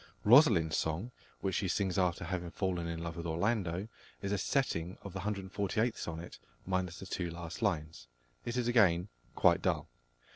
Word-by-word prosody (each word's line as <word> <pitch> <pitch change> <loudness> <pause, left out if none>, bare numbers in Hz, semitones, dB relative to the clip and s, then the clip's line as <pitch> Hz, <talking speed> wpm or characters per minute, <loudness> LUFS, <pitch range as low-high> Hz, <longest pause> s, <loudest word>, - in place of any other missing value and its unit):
Rosalind's 105 - +6
song, 85 +10 -1 0.3
which 95 - -1
she 95 +3 0
sings 95 0 0
after 90 -2 +1
having 90 -2 -3
fallen 90 -2 -2
in 85 0 -4
love 85 0 -5
with 85 0 -4
Orlando, 95 +2 0 0.4
is 100 - -1
a 100 - +2
setting 90 - 0
of 100 - -7
the 95 - -4
148th 100 +3 -1
Sonnet, 85 +1 -6 0.3
minus 90 -2 -1
the - - -8
two 90 -2 -3
last 85 0 -7
lines. 75 -2 -1 0.4
It 120 +1 -3
is 120 -1 +1
again 100 -6 +4 0.3
quite - - +4
dull. - - 0
90 Hz, 170 wpm, -33 LUFS, 85-105 Hz, 0.4 s, Rosalind's